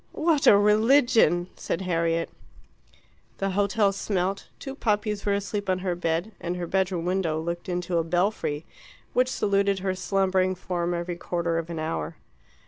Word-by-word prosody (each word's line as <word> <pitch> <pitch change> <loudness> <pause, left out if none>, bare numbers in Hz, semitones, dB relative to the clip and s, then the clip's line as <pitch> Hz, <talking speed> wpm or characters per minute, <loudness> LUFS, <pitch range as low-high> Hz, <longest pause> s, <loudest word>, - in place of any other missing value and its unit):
"What 310 -3 +2
a 200 - +9
religion!" 215 - +4
said 170 - -3
Harriet. 165 -2 0 1.1
The 195 0 -1
hotel 200 +1 +2
smelt, 195 -1 -2
two 270 - -7
puppies 210 -5 -1
were 200 - +3
asleep 200 0 -3
on 185 - +2
her 180 - +1
bed, 170 +3 -1
and 175 +1 -3
her 175 - -3
bedroom 185 -1 0
window 180 -4 0
looked 170 +2 -4
into 175 -1 -1
a - - +1
belfry, 170 -3 -1 0.5
which 255 +1 +3
saluted 200 -4 +1
her 190 0 -1
slumbering 185 0 +1
form 175 -1 -2
every 170 0 -3
quarter 170 -1 -1
of 165 0 -6
an 170 - -5
hour. 80 - -3
185 Hz, 155 wpm, -26 LUFS, 170-200 Hz, 1.1 s, a